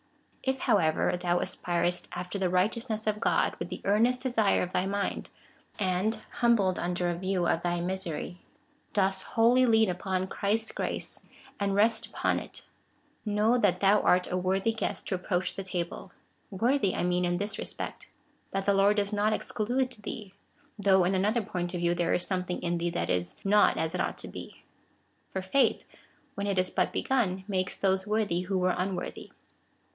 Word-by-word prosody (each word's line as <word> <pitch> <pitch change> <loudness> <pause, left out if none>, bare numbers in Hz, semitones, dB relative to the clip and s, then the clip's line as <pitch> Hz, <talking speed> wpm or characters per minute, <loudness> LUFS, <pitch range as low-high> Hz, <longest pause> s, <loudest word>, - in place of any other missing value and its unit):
If, 265 0 -1
however, 180 - +2
thou 175 0 0
aspirest 175 0 -1
after 180 +3 -4
the 185 -2 +1
righteousness 220 +4 0
of 210 -1 0
God - - +2
Avith - - -3
the - - -6
earnest 230 +5 +3
desire 235 -6 +2
of 180 - -5
thy 185 - +1
mind, 200 0 -2 0.5
and, 190 +3 +1 0.2
humbled 215 -6 +3
under 175 0 -1
a - - -2
view 185 0 -1
of 165 - +1
thy 175 0 0
misery, 180 -1 -3 0.5
dost 190 -2 +2
wholly 240 +4 +3
lean 220 -1 +5
upon 185 +1 -2
Christ's 215 +3 -1
grace, - - -4 0.4
and 200 -1 0
rest 220 +3 +3
upon - - 0
it, - - -10 0.6
know 215 +3 +2
that - - +2
thou 200 +1 +4
art 180 0 +3
a - - 0
worthy 190 +4 +1
guest 220 - -3
to 190 - +1
approach 180 0 -1
that 195 -1 -5
table 175 0 -4 0.2
— - - -40
woi^thy 225 +1 +1
I - - 0
mean 180 0 +1
in 175 0 +1
this 205 +2 -3
respect, - - -5 0.4
that 195 0 -2
the 200 - +4
Lord 200 +2 +4
does 205 0 0
not 210 +1 +2
exclude 245 +4 -1
thee, 200 -1 -7 0.5
though 190 -2 +4
in 180 +2 +1
another 210 +5 +1
point 175 -2 -3
of - - -2
view 170 0 +2
there 175 -1 +1
is 175 - -1
something 180 -2 -2
in 175 0 0
thee 175 +1 0
that 170 - -2
is 90 0 -1
not 205 +1 +4
as 160 +1 -1
it 180 - -1
ought - - -2
to - - -6
be. - - -10 0.7
For 190 - -3
faith, 225 +9 +2 0.5
when 200 0 -3
it 200 -2 0
is 185 0 +1
but - - +1
begun, 195 -8 0
makes 185 -2 -1
those 190 0 0
worthy 210 -5 +1
who 190 +1 -1
were 180 0 +2
^mworthy. 185 0 -4
190 Hz, 180 wpm, -29 LUFS, 180-210 Hz, 0.7 s, lean